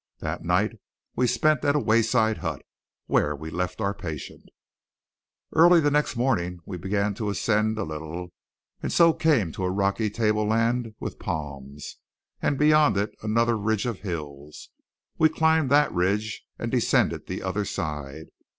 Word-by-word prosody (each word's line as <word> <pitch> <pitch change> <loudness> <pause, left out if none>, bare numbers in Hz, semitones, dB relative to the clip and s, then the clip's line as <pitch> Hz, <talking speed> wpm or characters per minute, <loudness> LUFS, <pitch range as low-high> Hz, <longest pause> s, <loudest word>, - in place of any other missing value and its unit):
That - - -4
night - - 0 0.4
we 125 +1 +2
spent 135 +4 +2
at 145 - +2
a - - +3
wayside 110 -2 +2
hut, 80 -6 -4 0.4
where 75 +1 +1
we 80 +2 -8
left 90 +3 -3
our 100 -2 0
patient. 80 -7 -7 1.1
Early 170 +2 +7
the 145 -2 +2
next 150 -2 +1
morning 90 -8 0
we 95 - -6
began 100 +3 -1
to 105 +1 -3
ascend 105 +2 +1
a 110 - -1
little; 80 +3 -6 0.5
and - - -3
so 170 -1 +5
came 135 - +2
to 95 - -5
a 90 - +1
rocky 100 +3 0
tableland 110 +2 0
with - - -6
palms, 70 -1 -6 0.4
and 140 - 0
beyond 150 -5 +4
it 100 +2 0
another 115 +2 +1
ridge 110 +1 0
of 115 -5 -3
hills. 75 -6 -7 0.5
We 160 - +6
climbed 160 -2 +2
that 145 +2 +4
ridge 100 +5 -1
and - - -4
descended - - +1
the - - -5
other 95 +2 -1
side. 75 -5 -5
105 Hz, 155 wpm, -25 LUFS, 90-125 Hz, 1.1 s, Early